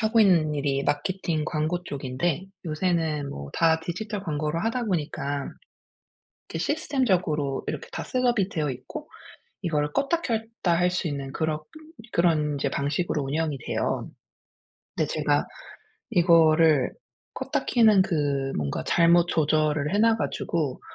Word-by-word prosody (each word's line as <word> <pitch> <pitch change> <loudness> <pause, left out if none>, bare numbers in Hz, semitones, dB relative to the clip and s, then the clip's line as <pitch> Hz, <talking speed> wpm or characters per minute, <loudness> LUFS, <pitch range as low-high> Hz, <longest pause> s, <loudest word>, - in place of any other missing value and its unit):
하고 225 +1 +2
있는 165 -7 +4
일이 140 -1 0
마케팅 160 +1 -1
광고 155 +4 -1
쪽인데 140 +5 -2 0.2
요새는 160 -3 0
뭐 70 0 -7
다 165 -1 +3
디지털 200 +5 -4
광고로 155 -1 -1
하다 230 +6 -1
보니까 145 -6 -2 1.0
이게 - - -4
시스템적으로 185 - 0
이렇게 470 - -4
다 - - -4
셋업이 245 -6 +1
되어 150 -6 -1
있고 125 - -8 0.6
이거를 150 -3 0
껐다 305 +5 +1
켰다 225 - -1
할 180 0 +2
수 180 -1 -1
있는 140 -2 -4
그럭 155 -1 -2 0.5
그런 155 -4 +2
인제 140 - -1
방식으로 145 +1 -1
운영이 150 +1 -1
돼요. - - -1 0.9
근데 - - 0
제가 - - +1 0.7
이거를 165 - +5 0.4
껐다 - - -2
켜는 220 -5 +5
그 145 -6 0
뭔가 70 -2 -2
잘못 170 0 +5
조절을 155 -1 +1
해 - - +3
놔 225 0 +5
가지고 155 - -2
160 Hz, 285 characters per minute, -26 LUFS, 150-185 Hz, 1.0 s, 이거를